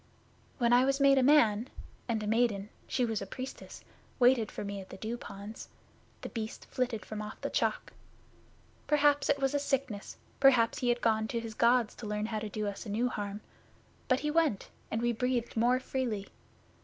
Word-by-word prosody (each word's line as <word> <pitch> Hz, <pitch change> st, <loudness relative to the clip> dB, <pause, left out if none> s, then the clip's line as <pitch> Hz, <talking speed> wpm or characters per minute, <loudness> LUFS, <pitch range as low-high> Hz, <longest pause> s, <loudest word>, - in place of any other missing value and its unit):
When 240 Hz, -2 st, +3 dB
I 245 Hz, +1 st, +6 dB
was 275 Hz, +1 st, +1 dB
made 275 Hz, -1 st, +6 dB
a -, -, +3 dB
man, 250 Hz, -4 st, +4 dB, 0.4 s
and 225 Hz, -3 st, -1 dB
a -, -, -3 dB
maiden 215 Hz, -2 st, +1 dB, 0.2 s
she 250 Hz, -, +1 dB
was 225 Hz, -3 st, -2 dB
a 195 Hz, -, -5 dB
Priestess 255 Hz, +6 st, -8 dB, 0.3 s
waited 245 Hz, -3 st, +4 dB
for -, -, -5 dB
me 200 Hz, 0 st, -4 dB
at 190 Hz, -, -13 dB
the -, -, -9 dB
Dew 220 Hz, +4 st, -4 dB
ponds, 205 Hz, -1 st, -9 dB, 0.5 s
The -, -, -6 dB
Beast 220 Hz, -2 st, -6 dB
flitted 245 Hz, -4 st, -2 dB
from 215 Hz, -1 st, -5 dB
off 210 Hz, 0 st, -7 dB
the -, -, -3 dB
Chalk. -, -, -1 dB, 0.9 s
Perhaps 290 Hz, -1 st, +3 dB
it 285 Hz, -, +4 dB
was 270 Hz, -1 st, 0 dB
a 285 Hz, -, +2 dB
sickness; 270 Hz, -7 st, -2 dB, 0.2 s
perhaps 255 Hz, -2 st, +5 dB
he 250 Hz, -3 st, 0 dB
had 240 Hz, 0 st, +1 dB
gone 220 Hz, -1 st, +2 dB
to 235 Hz, -, -2 dB
his 225 Hz, -1 st, -6 dB
Gods 235 Hz, 0 st, +3 dB
to 220 Hz, -, -7 dB
learn 210 Hz, 0 st, -2 dB
how 220 Hz, -1 st, -2 dB
to 215 Hz, 0 st, -5 dB
do 215 Hz, +1 st, -3 dB
us 205 Hz, +2 st, -5 dB
new 225 Hz, +5 st, 0 dB
harm. 205 Hz, -2 st, -5 dB, 0.7 s
But 255 Hz, 0 st, +2 dB
he 300 Hz, +1 st, -1 dB
went, 310 Hz, -11 st, +1 dB, 0.2 s
and 225 Hz, +2 st, -2 dB
we 240 Hz, -, +3 dB
breathed 245 Hz, 0 st, -1 dB
more 240 Hz, +3 st, +3 dB
freely. 245 Hz, -6 st, -2 dB
235 Hz, 195 wpm, -31 LUFS, 215-255 Hz, 0.9 s, I